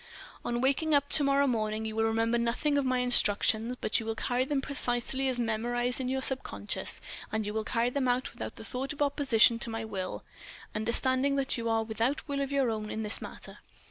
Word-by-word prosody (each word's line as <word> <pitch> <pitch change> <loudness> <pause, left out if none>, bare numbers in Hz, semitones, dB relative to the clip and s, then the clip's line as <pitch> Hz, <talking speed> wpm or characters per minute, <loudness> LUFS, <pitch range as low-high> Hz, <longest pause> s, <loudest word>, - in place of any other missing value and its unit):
"On 240 0 -1
waking 285 +4 +2
up 285 0 +2
to 305 - +5
morrow 280 0 +3
morning, 220 -3 -1
you 220 0 -4
will 225 0 +2
remember 225 +1 +1
nothing 240 +6 0
of 285 - +2
my 255 0 +1
instructions, 235 -1 +3
but - - +1
you 225 - -6
will 225 - -1
carry 245 +2 0
them 285 0 0
precisely 270 -1 0
as 255 -2 -1
memorized 240 +2 0
in 255 - -2
your 265 0 -1
subconciousness, 105 - -3 0.3
and 220 -1 -1
you 210 - -3
will 220 0 -1
carry 235 +2 0
them 270 -1 0
out 250 +1 0
without - - -6
thought 255 +6 -4
of 295 - -10
opposition 265 -5 +4
to 235 - -2
my 225 0 -4
will, 190 -4 -5 0.5
understanding 260 +5 +1
that 275 -1 0
you 230 -1 -2
are 225 0 +2
without 230 +7 -2
will 280 -1 -2
of 275 0 -2
your 270 -4 +2
own 215 -1 -4
in 220 - -3
this 210 0 +4
matter. - - -8
240 Hz, 210 wpm, -30 LUFS, 225-270 Hz, 0.5 s, to